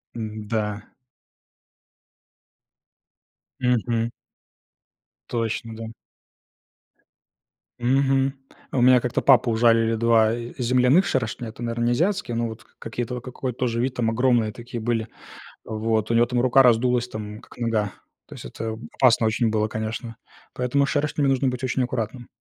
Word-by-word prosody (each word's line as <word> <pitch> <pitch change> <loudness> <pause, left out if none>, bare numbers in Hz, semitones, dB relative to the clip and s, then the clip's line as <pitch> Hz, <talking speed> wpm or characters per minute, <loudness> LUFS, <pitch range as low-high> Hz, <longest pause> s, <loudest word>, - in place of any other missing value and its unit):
М-да. 110 -1 -4 2.7
Мгм. 120 -2 +1 1.2
Точно, 115 0 -2
да. 115 0 -7 1.9
Мгм, 135 +2 +2 0.4
у 130 - 0
меня 125 0 +6
как-то 120 0 -1
папу 130 -3 +5
ужалили 115 0 +3
2 115 -1 +3
и 120 0 -6
земляных 125 +8 +4
шершня. 120 -2 -2
Это, 110 - -12
наверно, 120 0 -1
не 120 - +2
азиатские, 175 - 0
но 115 0 0
вот 110 -1 -9
к - - -32
какие-то 120 +2 -4
вот 120 - -7
какой-то 125 -1 -5
тоже 115 -2 0
вид 130 0 -1
там 120 -3 0
огромные 115 -2 +2
такие 120 0 -7
были. 115 -1 -1 0.6
Вот 110 0 -1
у - - +2
него 115 +1 +5
там 120 0 0
рука 130 +2 +5
раздулась 125 0 +3
там 105 -1 -7
как - - -17
нога. 110 -4 0 0.3
То - - -12
есть - - -10
это 110 -1 -5 0.2
опасно 120 -3 +4
очень 110 +1 +1
было, 110 0 0
конечно, 110 +2 -5 0.4
поэтому 125 +3 +1
с - - -6
шершнями 145 -1 0
нужно 135 0 +2
быть 125 0 -3
очень 130 +1 0
аккуратным. 120 0 -3
120 Hz, 140 wpm, -24 LUFS, 110-125 Hz, 2.7 s, меня